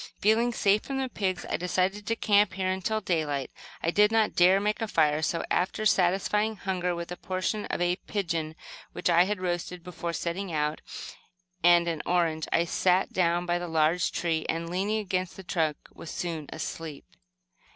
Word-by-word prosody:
Feeling 225 +3 +3
safe 210 -2 +3
from 275 - -4
the 265 -1 -1
pigs, 190 -5 -2
I - - -1
decided 185 +3 -1
to 230 - +1
camp 205 -3 +3
here 185 0 -1
until 215 +4 -1
daylight. 155 -7 -1 0.3
I 165 - +2
did 210 +3 +4
not 220 -1 +2
dare 185 +2 +5
make 210 +2 -1
a 225 - 0
fire, 155 -5 +2
so, 165 +1 0
after 190 +4 0
satisfying 205 +3 +2
hunger 180 -3 -2
with 170 0 -6
a - - -3
portion 185 +4 -2
of - - -3
a 175 0 +1
pigeon 165 -7 -3 0.4
which - - 0
I 170 +1 +6
had 205 0 -2
roasted 175 -1 -3
before 170 -1 -5
setting 175 +3 -3
out, 150 0 -1 0.8
and 175 0 +6
an 165 -3 -1
orange, 165 -3 +1
I 170 - +3
sat 180 +2 +2
down 175 -1 +2
by 175 0 +1
a 175 0 -4
large 160 +2 +2
tree 165 -2 -1
and, 165 +1 -1
leaning 200 +4 0
against 185 -3 -2
the 190 - -8
trunk, 160 -4 0 0.2
was 165 - -10
soon 165 -4 -4
asleep. 160 -3 -6
180 Hz, 180 wpm, -28 LUFS, 170-200 Hz, 0.8 s, I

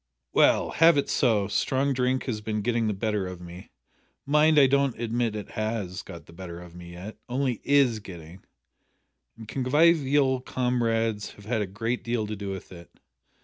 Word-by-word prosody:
"Well - - +4
have 165 -1 +5
it 140 - 0
so. 110 -6 +2
Strong 135 +6 0
drink 130 0 0
has 110 -5 -3
been 105 -1 -3
getting 115 -1 +1
the 105 - 0
better 105 -2 -1
of 90 -1 -7
me 90 +1 -11 0.6
mind 150 +2 +4
I 140 - +8
don't 140 -2 +1
admit 115 -1 -1
it 105 - -6
has 110 -3 -3
got 85 - -11
the - - -16
better 85 -1 -8
of 90 -1 -12
me 85 0 -11
yet 95 +5 -9
only 125 -2 -1
is 135 -5 +3
getting 90 -2 -11 0.9
and 110 -1 -11
convivial 140 0 +3
comrades 115 -4 -1
have 105 - -16
had 110 0 -1
a 100 - -2
great 115 +5 -3
deal 115 -2 -1
to 105 +1 -5
do 100 -1 -6
with 95 -1 -7
it. 85 -2 -12
115 Hz, 180 wpm, -26 LUFS, 100-130 Hz, 0.9 s, I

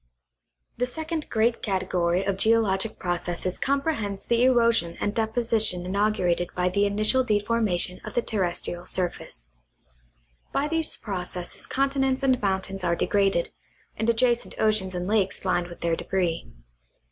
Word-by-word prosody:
The 250 +1 0
second 315 +4 -4
great 230 +1 +1
category 185 -2 0
of 195 0 0
geologic 220 -1 +2
processes 175 0 -2
comprehends 275 -8 -1
the 235 0 +2
erosion 230 -9 +3
and 205 - -1
deposition 220 -5 +1
inaugurated 185 -3 +1
by 180 0 +1
the 200 +2 +2
initial 215 +6 +2
deformation 205 -5 0
of - - -8
the 240 - +2
terrestrial 175 -3 -2
surface. 175 - -2 1.0
By 285 - 0
these 325 0 -1
processes 180 -3 -4
continents 270 -1 0
and 260 -2 +3
mountains 195 -1 -1
are 170 -1 +2
degraded, 195 -2 +1 0.4
and 220 +1 -1
adjacent 235 +1 +1
oceans 215 -4 +2
and 180 0 -2
lakes 200 -2 +1
lined 175 -2 +1
with 175 - -12
their 170 -1 +1
debris. 175 - -1
205 Hz, 135 wpm, -26 LUFS, 180-235 Hz, 1.0 s, erosion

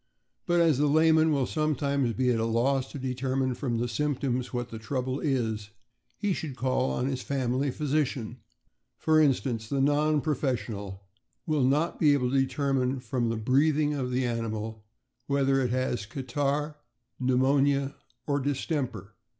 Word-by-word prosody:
But 175 0 +3
as 160 -5 +3
the 150 - +3
layman 160 +1 +4
will 140 -3 +2
sometimes 140 -4 0
be 125 +2 +1
at 115 - +1
a - - +1
loss 130 +4 +1
to - - -6
deter 130 0 -2
mine 130 -1 +1
from 120 -1 -2
the 120 +1 -1
symptoms 130 0 -1
what 120 -1 -3
the 115 - -7
trouble 130 +3 -2
is, 110 -8 -1 0.5
he 205 -2 0
should 150 -6 -5
call 130 +1 0
on 125 - -1
his 130 -1 -2
family 135 0 -1
physician. 135 -4 -1 0.6
For 155 0 +3
instance, 125 -6 +1
the 140 - 0
non 150 +2 +3
profes 140 -4 0
sional 100 -4 -7 0.4
will 155 -3 +1
not 145 +6 +1
be 150 -3 +5
able 125 -3 +1
to 135 - +3
determine 135 -1 0
from 120 -1 -1
the 115 - -1
breathing 145 +6 +2
of 130 -3 -2
the 125 +1 0
animal 110 -2 -3 0.4
whether 135 -1 +2
it 125 - 0
has 125 -3 -1
catarrh, 145 +4 -2 0.4
pneumonia, 135 +2 +2 0.3
or 140 +1 0
distemper. 130 - -3
135 Hz, 160 wpm, -28 LUFS, 125-145 Hz, 0.6 s, be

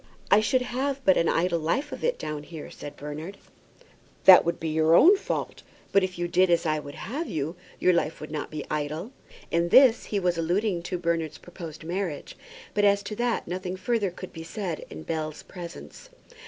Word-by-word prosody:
"I 200 - +8
should 250 +4 +2
have 270 +3 -2
but 190 - +6
an 165 - +2
idle 170 0 +1
life 260 - -1
of - - -7
it - - +1
down 150 -1 -4
here," 155 0 -9
said 145 0 -9
Bernard. 155 +7 -7 0.9
"That 185 -1 +10
would 170 - -1
be 160 - -2
your 160 +1 +4
own 370 - +8
fault. 390 - -4 0.3
But 200 - +4
if 185 -1 -3
you 175 0 -1
did 185 +1 +3
as 170 -1 +2
I 155 -1 +1
would 145 -1 -9
have 300 +8 -4
you, 155 +2 -3 0.2
your 180 - +3
life 165 -2 0
would 155 - -8
not 150 -2 -4
be 155 - -5
idle." 150 - -3 0.4
In 170 +1 +1
this 255 +2 +6
he 205 - -1
was 175 -2 0
alluding 180 +2 0
to 180 +1 -3
Bernard's 170 -3 -1
proposed 165 -3 -10
marriage, 175 -2 -4 0.4
but 205 - +1
as 200 0 +4
to 210 +1 -5
that 240 -1 -1
nothing 180 +1 -4
further 205 +1 0
could 180 +1 -10
be 165 - -8
said 175 -2 -5
in - - -8
Bell's 155 -2 -4
presence. 175 - -10
175 Hz, 200 wpm, -26 LUFS, 160-200 Hz, 0.9 s, That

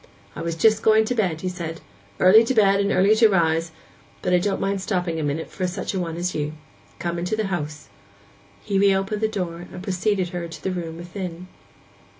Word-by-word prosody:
'I 150 - -5
was 165 0 -2
just 215 +5 +3
going 220 0 +4
to 250 - -1
bed,' 185 -9 0
he 185 - -3
said; 170 -3 -5 0.4
'"Early 205 +5 +7
to 260 - 0
bed 200 -2 +4
and 200 0 +1
early 195 +3 +4
to 225 -1 +6
rise," 165 -3 +2 0.5
but 180 - +1
I 180 - +5
don't 195 +2 -1
mind 195 0 -1
stopping 180 -4 -1
a - - -2
minute 145 +2 -2
for 185 - -2
such 180 +3 -4
a 190 - -1
one 165 -2 -3
as 180 +1 -2
you. 150 0 -2 0.4
Come 170 0 -3
into 180 +5 -2
house.' 150 -5 -4 0.8
He 195 - 0
reopened 195 +1 +2
the 220 - +3
door, 175 -5 -4
and 180 - -8
preceded 190 -1 0
her 175 -1 -4
to 165 - -10
the 190 - -1
room 165 -3 -5
within. 180 0 -7
180 Hz, 205 wpm, -23 LUFS, 170-200 Hz, 0.8 s, Early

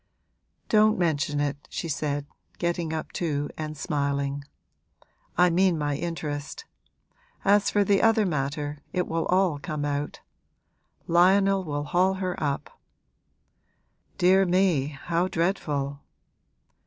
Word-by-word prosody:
'Don't 215 0 +4
mention 150 -4 0
it,' 145 0 -2
she 170 - -4
said, 145 -1 -2 0.3
getting 170 -2 -1
up 160 -1 -4
too 145 -4 -2
and 155 -1 -5
smiling. 140 -1 -1 0.9
'I 180 0 +5
mean 180 0 +3
my 145 -1 -1
interest. 155 - -4 0.8
As 205 0 +4
for 205 - +3
the 200 0 +3
other 225 -1 +4
matter, 145 -2 -2
it 180 -1 0
will 165 0 -1
all 185 -5 +2
come 150 -2 -4
out. 145 0 -3 0.8
Lionel 190 +3 +4
will 145 -3 -3
haul 180 +5 +2
her 185 -1 -2
up.' 140 -2 -3 1.4
'Dear 190 +2 +5
me, 175 -6 +2
how 170 +5 -1
dreadful!' 150 -6 -1
165 Hz, 115 wpm, -26 LUFS, 145-185 Hz, 1.4 s, I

